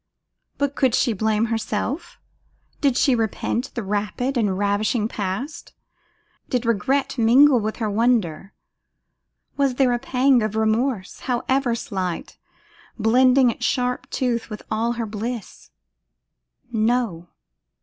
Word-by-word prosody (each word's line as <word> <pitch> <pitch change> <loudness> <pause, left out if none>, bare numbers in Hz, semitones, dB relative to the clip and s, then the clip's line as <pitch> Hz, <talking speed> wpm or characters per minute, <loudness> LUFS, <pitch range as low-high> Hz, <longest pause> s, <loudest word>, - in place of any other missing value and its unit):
But 285 -1 0
could 260 -4 +2
she 235 - +2
blame 220 +2 +1
herself? 230 +8 -3 0.6
Did 275 -4 +2
she 270 - +4
repent 230 +3 -2
the 235 - -3
rapid 210 +7 -2
and 205 -6 +1
ravishing 205 +2 +1
past? 215 +8 -5 0.8
Did 250 -1 -1
regret 255 +4 0
mingle 250 +4 +6
with 215 0 -3
her 225 - -2
wonder? 205 -5 0 1.1
Was 275 -3 +1
there 255 -2 +3
a 240 - 0
pang 260 0 +3
of 215 -1 -2
remorse, 220 -1 0
however 250 0 +1
slight, 185 -6 -4 0.6
blending 250 +3 +4
its 240 - -9
sharp 250 -2 -1
tooth 240 -3 -1
with 210 -1 -7
all 230 +2 0
her 235 -1 -3
bliss? 220 +2 -6 1.0
No! 220 -6 0
235 Hz, 120 wpm, -22 LUFS, 215-255 Hz, 1.1 s, mingle